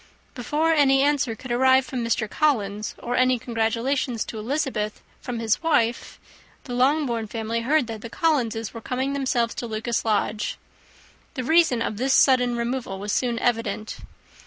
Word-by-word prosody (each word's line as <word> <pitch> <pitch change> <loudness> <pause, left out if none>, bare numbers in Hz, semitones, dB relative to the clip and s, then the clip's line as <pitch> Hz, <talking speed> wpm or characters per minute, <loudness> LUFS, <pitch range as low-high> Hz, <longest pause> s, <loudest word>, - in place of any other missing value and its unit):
Before 300 +6 0
any 270 -3 +4
answer 285 -5 +1
could 255 +2 -9
arrive 260 +1 +4
from 255 -3 -4
Mr. 230 -1 0
Collins, 210 -7 0
or 245 +1 -3
any 255 0 +3
congratulations 230 +2 -1
to 220 - -7
Elizabeth 235 -3 -2 0.2
from 245 -1 -5
his 225 -2 0
wife, 240 -8 0 0.4
the 245 - -7
Longbourn 250 -3 +1
family 225 +1 -3
heard 290 +3 +2
that 220 -2 -7
the 230 - -7
Collinses 230 -9 0
were 230 - -8
come 260 +4 -2
themselves 255 -4 0
to 240 - -5
Lucas 225 +2 -2
Lodge. 210 -1 -1 0.8
The 255 - -3
reason 290 -4 +3
of 215 - -3
this 265 +3 +2
sudden 250 -3 +4
removal 235 -4 -3
was 205 +2 -4
soon 240 0 0
evident. 225 -3 -2
240 Hz, 160 wpm, -24 LUFS, 225-265 Hz, 0.8 s, any